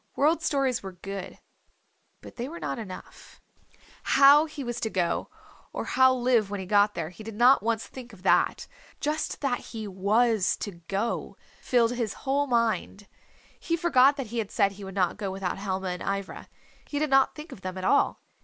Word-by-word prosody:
World 310 +4 +2
Stories 275 -5 0
were 190 -1 -8
good. 195 +1 -7 0.8
But - - -12
they 245 +2 -4
were 340 +2 -8
not - - -4
enough. 190 -5 -10 0.6
How 280 +3 +6
he 305 -3 -7
was 240 -1 -4
to 220 - -2
go, 180 -4 -1 0.4
or - - -4
how 260 0 +4
live 245 -4 +2
when 205 0 -4
he 190 - -5
got 205 +2 +3
there 165 0 -4
he 215 - -12
did 220 -1 -8
not 245 +4 +5
once 225 0 -1
think 250 -2 -11
of 195 -4 -16
that. - - +2 0.3
Just 300 +1 -2
that 270 -4 0
he 220 -2 -7
was 205 +2 +2
to 205 - -5 0.2
go 205 +4 -2 0.2
filled 240 -2 +2
his 235 -4 -2
whole 280 +2 +1
mind. 230 -4 0 0.5
He 335 - -1
forgot 285 -5 +4
that 270 - -3
he 235 - -1
had 210 -3 -3
said 200 - +2
he 200 +1 -11
would 190 0 -8
not 185 -2 +1
go 205 -2 -3
without 190 -1 -3
Helma 190 -1 -3
and 180 0 -5
Ivra. 195 0 -4 0.4
He 290 - -4
did 300 -1 0
not 270 0 +4
think 300 +2 -10
of 190 - -11
them 185 0 -5
at 185 - -4
all. 280 - +2
225 Hz, 195 wpm, -27 LUFS, 195-265 Hz, 0.8 s, How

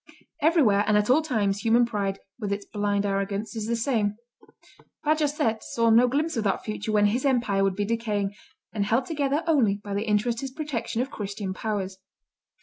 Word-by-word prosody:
Everywhere 285 - +4
and 210 -1 +4
at 210 +3 +2
all 295 +5 +5
times 210 -10 0
human 230 +2 +4
pride, 200 -4 -2 0.2
with 205 -3 -3
its 200 0 -3
blind 205 -1 -1
arrogance, 200 +2 -2
is 220 -1 -3
the 235 - 0
same. 225 -4 0 0.9
Bajazet 295 -7 +1
saw 230 -1 +1
no 235 +3 +6
glimpse 300 +6 0
of 225 - -1
that 195 -3 -1
future 215 0 -3
when 210 -1 +4
his 230 +5 +1
empire 240 -8 +2
would 195 -1 +1
be 205 +1 -1
decaying, 210 -3 -1 0.4
and 210 -2 0
held 230 +5 +1
together 290 -1 -1
only 265 -12 +3
by 205 0 -7
the 205 +3 -2
interested 235 +5 0
protection 250 -6 -2
of 265 - -8
Christian 200 -2 -4
powers. 195 -2 -3
220 Hz, 180 wpm, -26 LUFS, 205-250 Hz, 0.9 s, no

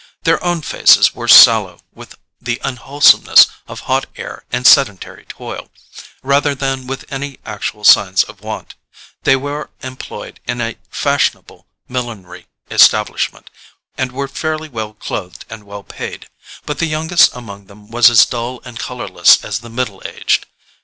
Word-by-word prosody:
Their 165 - +1
own 175 -3 -2
faces - - +4
were - - -7
sallow - - +7
with - - -14 0.3
the 120 0 -3
unwholesomeness 135 +2 +4 0.2
of - - -9
hot - - -1
air - - -9
and 125 - -3
sedentary 110 -10 +3
toil, - - -9 0.5
rather 140 +1 +1
than 135 -1 -4
with 135 0 -6
any 140 0 -6
actual 105 0 -6
signs 95 -2 +5
of 105 -2 -15
want: 110 0 -8 0.5
they 135 - +5
were 145 +2 -5
employed 130 0 -9
in 120 0 -3
a 115 -1 -4
fashionable - - -2 0.2
millinery 115 -8 -7 0.2
establishment, - - +2 0.4
and 130 -1 -3
were 140 +2 -4
fairly 155 +3 -4
well 110 -4 -6
clothed 90 -4 -7
and 110 -2 -10
well 100 0 -10
paid; - - -8 0.4
but 150 - -5
the 165 - 0
youngest 160 +2 +3
among 100 -5 -11
them 105 +2 -18
was 120 0 +5
as 120 -2 +6
dull 120 +1 -5
and 120 -2 -10
colourless 125 +1 +2
as 100 -2 -3
the 115 +1 -13
middle 115 -4 -4
aged. - - -2
125 Hz, 150 wpm, -16 LUFS, 110-140 Hz, 0.5 s, sallow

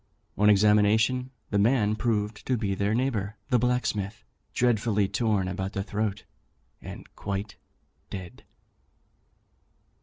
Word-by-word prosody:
On 105 +1 +4
examination, 105 +5 +4 0.2
the 100 - +2
man 110 -1 +3
proved 105 -2 -1
to 130 - +2
be 100 -3 -1
their 100 +2 0
neighbour 115 -5 -1
the 125 -3 +4
blacksmith, 110 -4 -1 0.3
dreadfully 110 -4 +2
torn 100 -2 0
about 95 +1 -3
the 95 - -2
throat, 105 0 -2 0.6
and - - -9
quite 100 0 -4 0.5
dead." 90 -3 -8
105 Hz, 115 wpm, -27 LUFS, 100-115 Hz, 0.6 s, On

